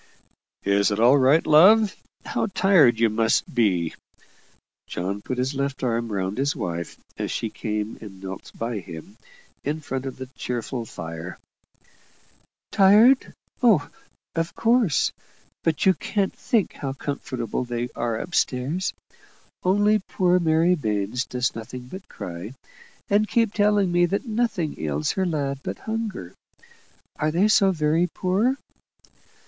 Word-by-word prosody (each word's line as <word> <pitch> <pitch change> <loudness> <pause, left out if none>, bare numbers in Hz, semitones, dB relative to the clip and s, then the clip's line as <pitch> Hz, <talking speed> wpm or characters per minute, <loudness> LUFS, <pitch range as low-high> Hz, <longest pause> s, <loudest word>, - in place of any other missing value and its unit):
"Is 100 +1 +2
all 115 +6 +5
right, 135 +5 +4
love? 200 +7 +6 0.3
How - - -1
tired 180 - +4
you 115 - +5
must 110 +1 +1
be!" 95 -9 +1 0.9
John 95 +3 -3
put 130 +4 -4
his 130 +3 -1
left 140 0 -3
arm 115 -2 -1
round 95 +3 -2
his 140 +1 +1
wife 85 -1 -4 0.2
as - - -2
she - - -3
came 105 0 -4
and 100 -4 -10
knelt 95 0 -8
by 115 -1 -3
him, 90 +3 -10 0.5
in 150 +3 -2
front 135 -3 -4
of 130 - -7
the 130 - -6
cheerful 120 0 -4
fire. 80 -2 -7 1.3
"Tired? 215 +7 +5 0.3
Oh, 205 - +4 0.4
of 165 0 -2
course; 230 - +2 0.5
but 160 -2 0
you 190 - +6
can't 200 +1 -1
think 230 -7 0
how 135 -2 -4
comfortable 130 -4 -4
they 120 0 -3
are 115 -2 -2
up 175 - -7
stairs. 140 +9 0 0.7
Only 205 +3 +3
poor 180 -1 +2
Mary 165 +1 +3
Baines 110 - -1
does 125 0 -1
nothing 115 +3 -7
but 190 +5 -10
cry, 90 +8 -7 0.5
and 210 +1 +2
keep 230 -3 +2
telling 205 -3 +2
me 175 0 +3
that 200 +8 -2
nothing 215 - -1
ails 75 -1 -1
her 190 -1 -1
lad 140 -4 -2
but - - -5
hunger. 220 - -4 0.8
Are 155 - 0
they 175 +7 +3
so 205 -2 +5
very 160 0 +1
poor?" 200 +10 0
140 Hz, 140 wpm, -24 LUFS, 110-190 Hz, 1.3 s, love